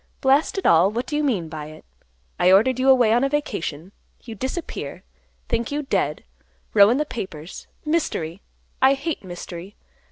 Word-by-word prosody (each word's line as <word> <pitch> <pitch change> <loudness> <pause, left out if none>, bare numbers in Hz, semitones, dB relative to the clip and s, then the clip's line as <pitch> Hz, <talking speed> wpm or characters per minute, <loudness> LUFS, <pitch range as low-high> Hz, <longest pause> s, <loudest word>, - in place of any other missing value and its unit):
Blast 275 +7 +2
it 390 - -3
all; 170 +3 +5
what 235 +4 -3
do 295 - -4
you 300 - +1
mean 210 - 0
by 155 -1 -7
it? 155 - -13 0.5
I 180 - +5
ordered 240 +7 +4
you 265 +1 +3
away 245 -4 +5
on 240 +3 +3
a 275 - +2
vacation. 185 - -3 0.3
You 230 - -8
disappear. 260 - -5 0.4
Think 235 +2 -1
you 295 +1 -2
dead; 270 - -1 0.5
row 205 -1 +7
in 245 - +2
the 300 - 0
papers, 185 - -7 0.2
mystery; 200 - -1 0.4
I 270 +1 +6
hate 290 0 -4
mystery. 175 +1 -8
230 Hz, 170 wpm, -23 LUFS, 175-275 Hz, 0.5 s, row